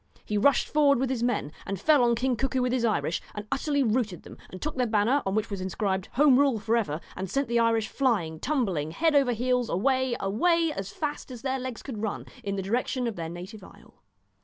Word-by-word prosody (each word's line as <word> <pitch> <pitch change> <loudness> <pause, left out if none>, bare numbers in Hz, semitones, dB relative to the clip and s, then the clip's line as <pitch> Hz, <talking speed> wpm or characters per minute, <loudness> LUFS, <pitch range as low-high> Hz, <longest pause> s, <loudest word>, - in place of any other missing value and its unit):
He 210 - -3
rushed 270 +7 +3
forward 290 -2 +4
with 260 +1 0
his 250 -3 -2
men 235 -11 0
and 195 -1 -4
fell 295 +3 +4
on 235 -1 +3
King 255 +2 0
Cuckoo 260 +1 0
with 250 - 0
his 255 -2 0
Irish, 215 -7 0
and 210 0 -5
utterly 285 +1 +1
routed 220 -6 -1
them, - - -11
and 185 - -9
took 305 +7 -4
their 250 -2 +1
banner, 225 +6 +2
on 195 - 0
which 215 0 -1
was 195 -2 -3
inscribed 190 +1 -2
' - - -31
Home 275 -1 +5
Rule 275 -5 +3
for 220 +2 0
ever,' 180 -10 -1 0.2
and 190 0 -4
sent 275 -1 0
the 235 0 +1
Irish 225 -1 +2
flying, 195 - 0
tumbling 195 - -1
head 320 - +1
over 275 -4 +4
heels, 250 +1 0
away, 260 +5 +1
away, 330 - +2
as 195 0 -4
fast 295 +2 -4
as 250 -2 -9
their 265 -1 -1
legs 255 -3 -6
could 225 -7 -6
run, 220 -2 -3 0.2
in 200 0 -2
the 195 - -3
direction 245 +5 -1
of 230 -3 -2
their 165 -1 -5
native 185 +4 -9
isle. - - -17
235 Hz, 235 wpm, -27 LUFS, 200-265 Hz, 0.2 s, Home